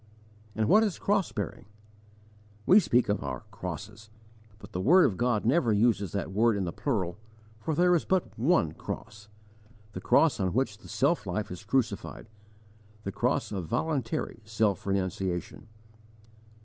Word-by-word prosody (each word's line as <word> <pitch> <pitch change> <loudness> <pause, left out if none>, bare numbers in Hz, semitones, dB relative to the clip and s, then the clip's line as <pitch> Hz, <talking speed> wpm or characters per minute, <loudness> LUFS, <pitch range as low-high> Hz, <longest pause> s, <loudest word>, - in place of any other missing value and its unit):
And 110 -1 0
what 215 - +6
is 210 -5 0
cross 195 -3 0
bearing? 100 - -5 1.0
We 195 - +7
speak 125 - +2
of 105 -5 -1
our 65 -3 -4
'crosses' 105 +5 -7 0.5
but - - -13
the 90 - -3
word 175 - +6
of 100 - +1
God 120 -1 0
never 125 -1 +3
uses 105 -3 +2
that 100 -1 -3
word 110 +2 +2
in 100 - -1
the 85 -2 -3
plural, 100 -9 -2 0.4
for 155 +7 -2
there 180 +2 +4
is 165 - +1
but 190 -2 -1
one 125 - +2
cross 105 +5 -8 0.6
the - - -7
cross 160 -7 +3
on 95 -2 0
which 110 -4 -1
the - - -14
self 140 - +1
life 105 +2 -3
is 90 +3 -7
crucified, 110 -2 -2 0.7
the 100 - -3
cross - - -1
of 95 -5 -4
voluntary 155 - -2
self 110 -3 0
renunciation. 95 -1 -2
110 Hz, 155 wpm, -28 LUFS, 95-135 Hz, 1.0 s, We